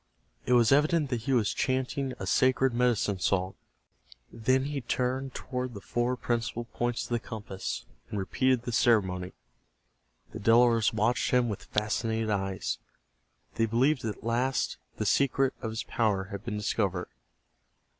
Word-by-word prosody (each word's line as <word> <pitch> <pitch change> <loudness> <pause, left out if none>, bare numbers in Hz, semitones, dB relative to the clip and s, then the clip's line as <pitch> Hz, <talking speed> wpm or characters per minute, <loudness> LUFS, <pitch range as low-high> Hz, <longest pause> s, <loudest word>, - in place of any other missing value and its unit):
It 125 - +3
was 120 -2 +5
evident 150 0 +3
that 120 -2 -1
he 135 - +2
was 115 -5 +2
chanting 130 0 -1
a - - -5
sacred 130 0 +3
medicine 120 -5 +1
song. 95 0 0 0.8
Then 130 +4 +2
he 145 -1 -3
turned 130 +2 -2
toward 125 -2 -4
the - - -6
four 120 +4 -1
principal 120 -1 -2
points 120 0 -2
of - - -8
the 120 -1 0
compass, 105 -3 -5 0.2
and - - -4
repeated 125 +5 +1
the 120 - -3
ceremony. 95 -7 +2 1.0
The 110 - -7
Delawares 115 +1 +4
watched 115 +3 +1
him 125 -2 +3
with 100 - -5
fascinated 110 +1 -1
eyes. 95 -2 -2 0.7
They 115 - +1
believed 130 +5 +2
that 110 -3 -3
at - - -18
last 120 +3 0 0.2
the 110 - -2
secret 135 +4 +2
of 115 - -3
his 110 +1 -4
power 100 -5 0
had 100 +1 -6
been 115 -3 -3
discovered. 100 -3 -1
120 Hz, 155 wpm, -29 LUFS, 105-130 Hz, 1.0 s, was